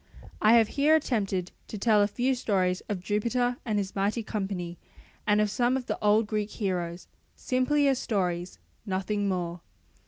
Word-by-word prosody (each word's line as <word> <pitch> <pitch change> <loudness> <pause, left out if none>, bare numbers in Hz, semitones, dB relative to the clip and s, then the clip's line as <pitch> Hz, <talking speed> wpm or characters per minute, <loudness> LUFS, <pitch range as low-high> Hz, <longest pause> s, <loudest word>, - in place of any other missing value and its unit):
I 215 +1 +6
have 225 -2 +5
here 295 +3 +4
attempted 200 - -1 0.2
to 215 - -6
tell 210 0 +4
a 205 - +4
few 250 +5 0
stories 185 -7 0
of 190 -4 -3
Jupiter 240 +4 0
and 215 -2 0
his 195 -1 -3
mighty 205 +4 0
company 190 -5 -4 0.5
and 210 0 +4
of 210 -1 +2
some 245 +4 +2
of 255 - -5
the - - -3
old 210 +2 +4
Greek 210 0 -2
heroes, 180 -5 -3 0.3
simply 280 +3 +1
as 270 -2 +2
stories, 180 -4 -2 0.3
nothing 200 0 -1
more. 175 -2 -3
210 Hz, 165 wpm, -28 LUFS, 190-240 Hz, 0.5 s, I